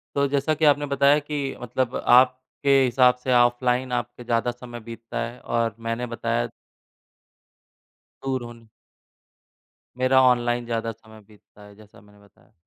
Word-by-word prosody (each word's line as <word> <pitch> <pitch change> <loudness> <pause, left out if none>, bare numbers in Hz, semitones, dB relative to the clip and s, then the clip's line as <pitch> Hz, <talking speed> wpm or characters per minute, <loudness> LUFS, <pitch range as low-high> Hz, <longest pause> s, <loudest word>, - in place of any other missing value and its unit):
तो 140 0 +2
जैसा 145 +3 0
कि 155 +1 -1
आपने 145 0 +3
बताया 140 +1 +3
कि 150 0 -4 0.2
मतलब 125 +1 -2
आपके 130 +3 +2
हिसाब 125 0 +4
से 130 - 0
ऑफलाइन 125 +1 +2
आपके 120 0 -4
ज़्यादा 115 +1 0
समय 120 0 -10
बीतता 115 0 -8
है, 120 +1 -10
और 115 -2 -1
मैंने 115 +2 -3
बताया 115 - -2 1.8
दूर 130 -2 -2
होना 115 -1 -12 1.3
मेरा 130 +1 +4
ऑनलाइन 120 -1 +2
ज़्यादा 115 -1 -3
समय 110 0 -17
बीतता 105 0 -20
है, 105 0 -15
जैसा 105 -1 -18
मैंने 105 0 -21
बताया। 100 +2 -27
120 Hz, 140 wpm, -24 LUFS, 115-130 Hz, 1.8 s, हिसाब